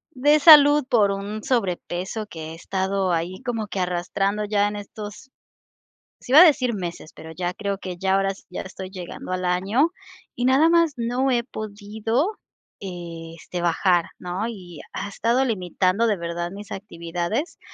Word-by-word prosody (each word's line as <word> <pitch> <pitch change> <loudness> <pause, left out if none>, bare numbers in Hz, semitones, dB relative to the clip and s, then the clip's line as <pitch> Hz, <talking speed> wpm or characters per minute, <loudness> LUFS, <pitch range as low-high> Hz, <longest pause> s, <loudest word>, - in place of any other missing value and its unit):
de 295 +4 +4
salud 295 -1 +8
por 210 -4 +4
un 200 +2 -5
sobrepeso 195 -2 -2
que 160 -4 -8
he - - -7
estado 190 +1 -1
ahí 175 +4 -2
como 230 -4 -3
que 200 - -4
arrastrando 190 +3 -1
ya 205 0 +2
en 205 - -4
estos 210 +4 -9 0.9
sí - - -8
iba 300 - +10
a - - +11
decir 265 -7 +3
meses, 175 -5 -6
pero 160 - -10
ya 175 +1 -3
creo 200 +1 -3
que 185 -2 -6
ya 190 +1 +1
ahora 195 0 +2 0.2
ya - - -5
estoy 190 0 -8
llegando 185 -1 -8
al 185 - -2
año 195 - +2 0.4
y 245 - -1
nada 275 +6 +5
más 335 -2 +4
no 245 +3 0
he 240 -1 +2
podido, 220 - -3 0.4
este, 170 -2 -7
bajar, 175 0 +2
¿no? 180 +5 -3
Y 180 -8 -9
ha 195 - -4
estado 235 +5 +1
limitando 185 -1 0
de 215 - +2
verdad 170 0 -4
mis 200 +1 -10
actividades 180 - -4
200 Hz, 160 wpm, -23 LUFS, 180-235 Hz, 0.9 s, a